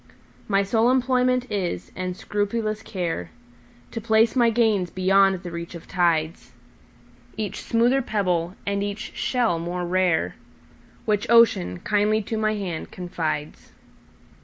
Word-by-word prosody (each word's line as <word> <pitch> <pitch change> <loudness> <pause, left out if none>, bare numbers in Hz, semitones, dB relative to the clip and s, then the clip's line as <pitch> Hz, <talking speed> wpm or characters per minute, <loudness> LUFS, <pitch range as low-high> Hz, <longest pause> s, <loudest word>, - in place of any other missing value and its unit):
My 200 -1 +2
sole 225 +4 +2
employment 255 -1 +2
is, 175 - -3
and 185 0 -4
scrupulous 215 +1 -2
care, 175 - -4 0.6
To 230 - -5
place 220 +1 +3
my 240 -2 +4
gains 215 -6 +2
beyond 190 0 +3
the 175 - -6
reach 170 +1 -6
of 170 - -10
tides,—Each 120 - -4
smoother 240 +4 +2
pebble, 180 -6 -1
and 200 0 -1
each 205 +1 -5
shell 235 -10 0
more 175 +1 -3
rare, 180 -1 +1 0.7
Which 210 -2 0
Ocean 205 - +4
kindly 210 +1 +1
to 220 +2 -3
my 215 0 +1
hand 185 -6 -4
confides. 160 -4 -4
195 Hz, 125 wpm, -24 LUFS, 170-220 Hz, 0.7 s, my